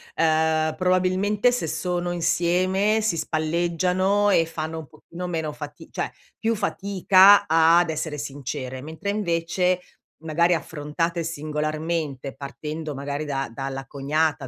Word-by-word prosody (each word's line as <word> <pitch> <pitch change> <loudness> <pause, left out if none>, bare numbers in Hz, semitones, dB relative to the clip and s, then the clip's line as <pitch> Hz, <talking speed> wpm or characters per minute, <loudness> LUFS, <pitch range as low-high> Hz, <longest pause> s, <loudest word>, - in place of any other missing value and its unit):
ehm, 160 -1 +2
probabilmente 185 +5 +2
se 245 -9 -2
sono 175 +2 -2
insieme 185 +5 +2
si 215 -6 0
spalleggiano 175 +6 +1
e 165 -4 +4
fanno 160 0 -5
un 155 - -9
pochino 170 +3 -8
meno 160 -3 -2
fati 150 0 -9
cioè, - - -3 0.3
più 225 0 +1
fatica 200 -1 +5
ad 165 +2 +5
essere 155 -1 -3
sincere, 135 -2 -5
mentre 160 +7 -6
invece, 180 -2 0 0.4
magari 165 +2 +2
affrontate 165 +2 -3
singolarmente 155 -2 -3
partendo 150 +2 -6
magari 140 +2 -3
da 135 -4 -2
dalla 135 +1 -5
cognata, 145 +1 -1
165 Hz, 120 wpm, -24 LUFS, 150-180 Hz, 0.4 s, fatica